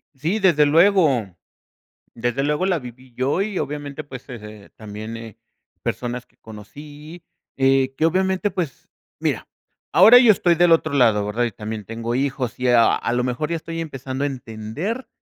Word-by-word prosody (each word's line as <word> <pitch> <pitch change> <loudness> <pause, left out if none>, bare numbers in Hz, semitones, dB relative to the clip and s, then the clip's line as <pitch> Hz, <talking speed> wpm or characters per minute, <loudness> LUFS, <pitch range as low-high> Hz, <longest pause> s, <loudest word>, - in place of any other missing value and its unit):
Sí, 165 +10 -1
desde 170 -7 +4
luego, 160 - +4 0.9
desde 120 +3 -2
luego, 150 +5 0
la 180 - +1
viví 125 -2 -11
yo, 135 +9 0
y 200 -2 -3
obviamente, 145 +1 -4
pues, 135 -2 -11
eh, 125 - -6
eh, 105 -1 -12
también, 110 +1 -8
eh, 115 -2 -10 0.4
personas 120 0 -4
que - - -36
conocí. 145 +10 -12 0.3
Eh, 135 0 +2
que 160 - +1
obviamente, 190 +3 +1
pues, 175 -7 -5 0.3
mira, - - -2 0.4
ahora 220 +7 +8
yo 240 -4 +7
estoy 175 -3 +2
del 175 0 +4
otro 155 -2 +3
lado, 110 -6 +3
¿verdad? 115 +4 -1
Y 115 - -3
también 105 +1 -6
tengo 115 +2 -4
hijos. 130 -2 -2
Y 125 - 0
a 120 -2 +5
a - - -2
lo 125 0 0
mejor 130 +5 -2
ya 170 - -1
estoy 165 +1 -6
empezando 135 -3 -5
a - - +1
entender, 130 - -5
135 Hz, 175 wpm, -21 LUFS, 120-165 Hz, 0.9 s, ahora